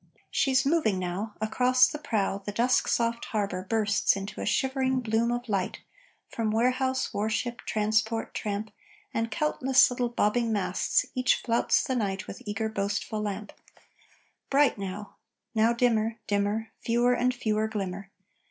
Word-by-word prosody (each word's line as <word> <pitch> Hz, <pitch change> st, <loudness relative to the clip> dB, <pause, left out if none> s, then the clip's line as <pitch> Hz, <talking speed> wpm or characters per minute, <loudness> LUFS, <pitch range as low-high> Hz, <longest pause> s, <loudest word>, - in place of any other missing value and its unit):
She's 270 Hz, -1 st, +2 dB
moving 280 Hz, -, +2 dB
now, 185 Hz, +4 st, -4 dB
Across 250 Hz, +4 st, +3 dB
the 300 Hz, -, -6 dB
prow 210 Hz, -8 st, -1 dB
The 205 Hz, -, -4 dB
dusk 240 Hz, +5 st, +2 dB
soft 235 Hz, 0 st, 0 dB
harbor 200 Hz, -4 st, -2 dB
bursts 215 Hz, -2 st, +2 dB
Into 195 Hz, +1 st, -6 dB
a -, -, -3 dB
shivering 265 Hz, -1 st, +1 dB
bloom 230 Hz, 0 st, +1 dB
of 240 Hz, +1 st, -3 dB
light 195 Hz, -4 st, -2 dB, 0.5 s
From 225 Hz, -2 st, -2 dB
warehouse, 255 Hz, +4 st, +1 dB
warship, 220 Hz, +3 st, -2 dB
transport, 220 Hz, +1 st, 0 dB
tramp, 210 Hz, +1 st, -3 dB, 0.4 s
And 225 Hz, 0 st, -1 dB
countless 270 Hz, +1 st, +3 dB
little 245 Hz, -1 st, -1 dB
bobbing 235 Hz, 0 st, +1 dB
masts 205 Hz, -3 st, +1 dB
Each 255 Hz, -1 st, +3 dB
flouts 235 Hz, -1 st, +1 dB
the 260 Hz, -, -1 dB
night 195 Hz, -5 st, -2 dB
With -, -, -9 dB
eager 205 Hz, +2 st, -1 dB
boastful 205 Hz, +1 st, -2 dB
lamp 210 Hz, 0 st, -4 dB, 1.0 s
Bright 280 Hz, +1 st, +4 dB
now, 200 Hz, +1 st, -6 dB, 0.4 s
now 225 Hz, +1 st, +3 dB
dimmer, 230 Hz, -2 st, +1 dB
dimmer, 205 Hz, +2 st, 0 dB
Fewer 240 Hz, +1 st, +2 dB
and 250 Hz, +1 st, +2 dB
fewer 220 Hz, -3 st, -1 dB
glimmer. 195 Hz, -2 st, -4 dB
220 Hz, 145 wpm, -28 LUFS, 205-245 Hz, 1.0 s, Bright